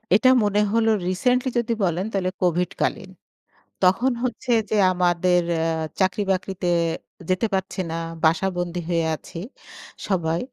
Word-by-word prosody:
এটা 255 Hz, +4 st, +5 dB
মনে 205 Hz, 0 st, +2 dB
হলো 225 Hz, -1 st, +3 dB, 0.2 s
রিসেন্টলি 250 Hz, +8 st, +1 dB
যদি 235 Hz, 0 st, -1 dB
বলেন 180 Hz, +1 st, 0 dB
তাহলে 190 Hz, -2 st, 0 dB
কোভিড 180 Hz, 0 st, +1 dB
কালীন। -, -, -1 dB, 0.7 s
তখন 210 Hz, +9 st, +4 dB
হচ্ছে 255 Hz, 0 st, -2 dB, 0.2 s
যে, -, -, 0 dB, 0.2 s
আমাদের 180 Hz, 0 st, +2 dB
এ্যা 160 Hz, -, 0 dB, 0.4 s
চাকরি-বাকরিতে 190 Hz, -1 st, 0 dB, 0.6 s
যেতে 185 Hz, +5 st, +1 dB
পারছি 190 Hz, 0 st, -2 dB
না। -, -, -3 dB, 0.3 s
বাসা 165 Hz, +4 st, +3 dB
বন্দি 175 Hz, 0 st, -2 dB
হয়ে 165 Hz, -2 st, +1 dB
আছি 160 Hz, -, -11 dB, 0.7 s
সবাই। 170 Hz, -4 st, 0 dB
185 Hz, 130 wpm, -23 LUFS, 175-210 Hz, 0.7 s, এটা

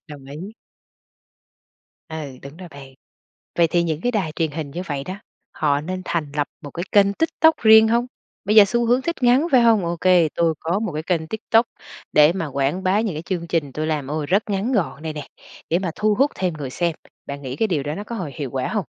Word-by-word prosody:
Đồng 145 Hz, -2 st, -11 dB
ý. 170 Hz, +10 st, -8 dB, 1.6 s
Ừ, 145 Hz, -5 st, -7 dB
đúng 140 Hz, +3 st, -10 dB
rồi 180 Hz, -1 st, -10 dB
bạn. 135 Hz, -3 st, -13 dB, 0.6 s
Vậy 170 Hz, -1 st, +5 dB
thì 170 Hz, +1 st, +1 dB
những 160 Hz, -2 st, -2 dB
cái 245 Hz, -, 0 dB
đài 190 Hz, -9 st, -1 dB
truyền 160 Hz, -1 st, -2 dB
hình 150 Hz, -2 st, -5 dB
như 175 Hz, +4 st, -4 dB
vậy 140 Hz, -3 st, -3 dB
đó, 185 Hz, +5 st, -6 dB, 0.4 s
họ 145 Hz, -1 st, 0 dB
nên 185 Hz, +3 st, -5 dB
thành 155 Hz, -4 st, -2 dB
lập 145 Hz, -1 st, 0 dB
một 145 Hz, -, -9 dB
cái 175 Hz, -, -4 dB
kênh 200 Hz, -1 st, +4 dB
TikTok 320 Hz, +4 st, +2 dB
riêng 220 Hz, 0 st, +8 dB
hông? 235 Hz, +2 st, +2 dB, 0.4 s
Bây 210 Hz, +2 st, +1 dB
giờ 210 Hz, -2 st, +9 dB
xu 235 Hz, +3 st, 0 dB
hướng 245 Hz, +3 st, +3 dB
thích 335 Hz, +5 st, -2 dB
ngắn 255 Hz, +7 st, +4 dB
phải 255 Hz, -3 st, +6 dB
hông? 225 Hz, -6 st, +4 dB
Ô 170 Hz, 0 st, -2 dB
kê, 180 Hz, -4 st, +4 dB
tôi 165 Hz, -1 st, +2 dB
có 175 Hz, +5 st, -1 dB
một 220 Hz, -6 st, -3 dB
cái 155 Hz, +1 st, -4 dB
kênh 165 Hz, -3 st, -1 dB
TikTok 225 Hz, +3 st, +2 dB, 0.5 s
để 150 Hz, +2 st, +6 dB
mà 180 Hz, -4 st, -3 dB
quảng 140 Hz, +6 st, -1 dB
bá 190 Hz, +3 st, +2 dB
những 210 Hz, -8 st, -2 dB
cái 155 Hz, -, -4 dB
chương 170 Hz, -1 st, -4 dB
trình 155 Hz, -5 st, -1 dB
tôi 155 Hz, +1 st, -2 dB
làm, 150 Hz, -4 st, -2 dB
ô, 150 Hz, 0 st, -2 dB
rất 195 Hz, +7 st, +1 dB
ngắn 200 Hz, +6 st, -1 dB
gọn 180 Hz, -, -1 dB
đây 160 Hz, -, -4 dB
nè, 150 Hz, -2 st, -7 dB, 0.4 s
để 170 Hz, +3 st, +2 dB
mà 180 Hz, -4 st, -3 dB
thu 210 Hz, 0 st, +1 dB
hút 275 Hz, +5 st, +2 dB
thêm 180 Hz, -3 st, -1 dB
người 145 Hz, -4 st, -6 dB
xem. 170 Hz, +3 st, -1 dB, 0.3 s
Bạn 140 Hz, 0 st, -7 dB
nghĩ 130 Hz, -1 st, -5 dB
cái 220 Hz, -, +1 dB
điều 155 Hz, -7 st, -1 dB
đó 150 Hz, +2 st, -4 dB
nó 205 Hz, -, -5 dB
có 235 Hz, +2 st, -7 dB
hồi 175 Hz, -9 st, -5 dB
hiệu 140 Hz, -4 st, -4 dB
quả 130 Hz, -1 st, -2 dB
hông? 210 Hz, -7 st, -2 dB
170 Hz, 240 wpm, -22 LUFS, 150-210 Hz, 1.6 s, giờ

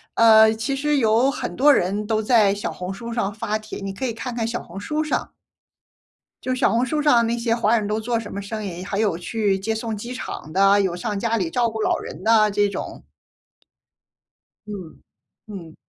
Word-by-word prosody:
呃， 220 Hz, -1 st, +7 dB
其 230 Hz, +5 st, -2 dB
实 295 Hz, +1 st, 0 dB
有 230 Hz, +2 st, +3 dB
很 275 Hz, -, -4 dB
多 290 Hz, +2 st, +6 dB
人 200 Hz, +2 st, 0 dB
都 220 Hz, -1 st, +1 dB
在 215 Hz, -3 st, +4 dB
小 205 Hz, -, -4 dB
红 180 Hz, +1 st, -6 dB
书 235 Hz, +4 st, -7 dB
上 210 Hz, -4 st, -1 dB
发 215 Hz, 0 st, -2 dB
帖， 215 Hz, -, -8 dB
你 195 Hz, -1 st, -5 dB
可 260 Hz, -, -4 dB
以 240 Hz, -, -2 dB
看 240 Hz, +2 st, -5 dB
看 225 Hz, -1 st, -1 dB
小 235 Hz, +1 st, -3 dB
红 185 Hz, +3 st, -9 dB
书 300 Hz, +9 st, -2 dB
上。 305 Hz, -, -2 dB, 1.1 s
就 255 Hz, 0 st, -1 dB
小 255 Hz, -, +2 dB
红 235 Hz, +3 st, +2 dB
书 300 Hz, +4 st, -1 dB
上 245 Hz, -6 st, +4 dB
那 235 Hz, +1 st, -1 dB
些 230 Hz, -1 st, 0 dB
华 230 Hz, 0 st, +2 dB
人 210 Hz, -, -2 dB
都 210 Hz, +1 st, -1 dB
做 235 Hz, +1 st, -1 dB
什 225 Hz, -2 st, -6 dB
么 200 Hz, -, -4 dB
生 215 Hz, +1 st, -5 dB
意， 180 Hz, -2 st, -6 dB
还 195 Hz, +2 st, -4 dB
有 205 Hz, -6 st, +1 dB
去 195 Hz, +1 st, -1 dB
接 220 Hz, +3 st, -2 dB
送 225 Hz, 0 st, -3 dB
机 240 Hz, +4 st, -6 dB
场 155 Hz, -10 st, -7 dB
的， 195 Hz, +2 st, +5 dB
有 185 Hz, -3 st, -1 dB
上 205 Hz, +2 st, -3 dB
家 230 Hz, +1 st, 0 dB
里 180 Hz, -6 st, -1 dB
照 235 Hz, +5 st, +1 dB
顾 220 Hz, 0 st, -5 dB
老 -, -, +1 dB
人 -, -, -9 dB
的 220 Hz, -1 st, +4 dB
这 205 Hz, 0 st, +1 dB
种。 -, -, -6 dB, 1.6 s
嗯 195 Hz, -6 st, -9 dB, 0.5 s
嗯。 175 Hz, -6 st, -9 dB
220 Hz, 225 characters per minute, -22 LUFS, 200-235 Hz, 1.6 s, 呃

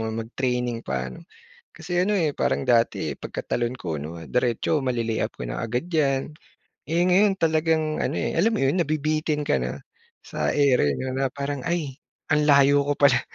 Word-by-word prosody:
mag 110 Hz, +1 st, -4 dB
training 125 Hz, -2 st, -1 dB
pa, 65 Hz, -, -4 dB
ano." -, -, -11 dB, 0.5 s
Kasi 180 Hz, +2 st, -6 dB
ano, 205 Hz, -, 0 dB
eh, 155 Hz, -4 st, 0 dB
parang 135 Hz, -, 0 dB
dati 110 Hz, -, +2 dB
pagkatalon 120 Hz, -, -3 dB
ko 85 Hz, -3 st, -3 dB
'no 75 Hz, +3 st, -6 dB
diretso 125 Hz, -, 0 dB
male-lay-up 115 Hz, -3 st, -1 dB
ko 60 Hz, -, -4 dB
na -, -, -4 dB
agad 120 Hz, +8 st, -2 dB
yan, 150 Hz, -3 st, 0 dB, 0.5 s
eh, 170 Hz, +3 st, +2 dB
ngayon 190 Hz, +2 st, +4 dB
talagang 160 Hz, -2 st, +1 dB
ano, -, -, -1 dB
eh, -, -, -1 dB
alam 220 Hz, +4 st, +2 dB
mo -, -, +1 dB
yun 140 Hz, +7 st, +2 dB
nabibitin 155 Hz, -1 st, 0 dB
ka 65 Hz, -, +1 dB
na 60 Hz, 0 st, -5 dB, 0.4 s
sa -, -, -3 dB
area 135 Hz, -, +4 dB
niyo 130 Hz, 0 st, -4 dB
na 135 Hz, +1 st, 0 dB
parang 140 Hz, +1 st, -4 dB
"Ay, 155 Hz, -6 st, -2 dB, 0.3 s
ang 150 Hz, +1 st, +2 dB
layo 140 Hz, 0 st, +6 dB
ko 145 Hz, 0 st, -1 dB
pala 135 Hz, -4 st, +5 dB
135 Hz, 175 wpm, -24 LUFS, 115-155 Hz, 0.5 s, layo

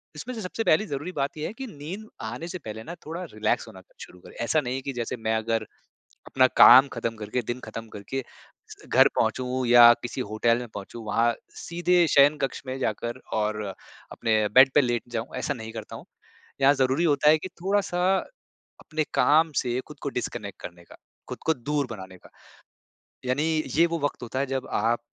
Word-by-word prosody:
इसमें 240 Hz, +12 st, -6 dB
से 220 Hz, -, -5 dB
सबसे 200 Hz, +4 st, -3 dB
पहली 215 Hz, +5 st, +3 dB
ज़रूरी 145 Hz, +6 st, -4 dB
बात 140 Hz, +2 st, -2 dB
ये 150 Hz, -, -3 dB
है -, -, -7 dB
कि 265 Hz, +2 st, -7 dB
नींद 185 Hz, +6 st, -8 dB
आने 120 Hz, +9 st, -5 dB
से 185 Hz, -, -5 dB
पहले 110 Hz, -4 st, -8 dB
ना 170 Hz, +6 st, -8 dB
थोड़ा 165 Hz, +4 st, -5 dB
रिलैक्स 110 Hz, 0 st, -1 dB
होना 95 Hz, -, -12 dB, 0.2 s
शुरू 90 Hz, -, -11 dB
करें, -, -, -15 dB
ऐसा 155 Hz, +6 st, +2 dB
नहीं 125 Hz, -2 st, -3 dB
है 135 Hz, -, -3 dB
कि 135 Hz, 0 st, -5 dB
जैसे 120 Hz, 0 st, -4 dB
मैं 110 Hz, 0 st, -1 dB
अगर 115 Hz, 0 st, -1 dB, 0.6 s
अपना 130 Hz, -1 st, +4 dB
काम 130 Hz, +3 st, +9 dB
खत्म 115 Hz, -1 st, -3 dB
करके 110 Hz, +4 st, -3 dB
दिन 125 Hz, -, -9 dB
खत्म 115 Hz, 0 st, -8 dB
करके, 105 Hz, +7 st, -5 dB, 0.7 s
घर -, -, +6 dB
पहुँचूँ 130 Hz, 0 st, 0 dB
या 120 Hz, 0 st, +9 dB
किसी 120 Hz, +2 st, -5 dB
होटल 115 Hz, +2 st, +2 dB
में 120 Hz, -1 st, -6 dB
पहुँचूँ 105 Hz, +3 st, -8 dB
वहाँ 115 Hz, +3 st, +2 dB, 0.2 s
सीधे 175 Hz, 0 st, +1 dB
शयन 145 Hz, +2 st, +6 dB
कक्ष 135 Hz, -, -2 dB
में 130 Hz, +1 st, -4 dB
जाकर 120 Hz, +1 st, -3 dB, 0.2 s
और 105 Hz, 0 st, -1 dB, 0.5 s
अपने 110 Hz, -2 st, +1 dB
बेड 130 Hz, +1 st, +8 dB
पे 145 Hz, -, +7 dB
लेट 120 Hz, -2 st, 0 dB
जाऊँ 115 Hz, +1 st, -4 dB
ऐसा 145 Hz, -, -2 dB
नहीं 110 Hz, -2 st, -8 dB
करता 110 Hz, -1 st, -8 dB
हूँ। -, -, -11 dB, 0.6 s
यहाँ 140 Hz, +2 st, +6 dB
ज़रूरी 135 Hz, +5 st, +1 dB
होता 150 Hz, -1 st, +3 dB
है 155 Hz, -, +5 dB
कि 185 Hz, -, -6 dB
थोड़ा-सा 190 Hz, -2 st, 0 dB, 0.8 s
अपने 155 Hz, 0 st, -2 dB
काम 160 Hz, +2 st, +4 dB
से 125 Hz, 0 st, 0 dB
खुद 150 Hz, -2 st, -12 dB
को 140 Hz, -, -2 dB
डिस्कनेक्ट 115 Hz, -5 st, -5 dB
करने 85 Hz, 0 st, -9 dB
का, -, -, -16 dB, 0.3 s
खुद -, -, -5 dB
को 160 Hz, -, +3 dB
दूर 145 Hz, +1 st, -2 dB
बनाने 95 Hz, -3 st, -9 dB
का। -, -, -18 dB, 1.0 s
यानी 130 Hz, +4 st, 0 dB, 0.3 s
ये 170 Hz, -, +6 dB
वो 165 Hz, -1 st, -3 dB
वक़्त 145 Hz, -3 st, -3 dB
होता 125 Hz, +2 st, -4 dB
है 140 Hz, -, +1 dB
जब 135 Hz, 0 st, -3 dB
आप 120 Hz, +1 st, +1 dB
130 Hz, 200 wpm, -26 LUFS, 115-150 Hz, 1.0 s, काम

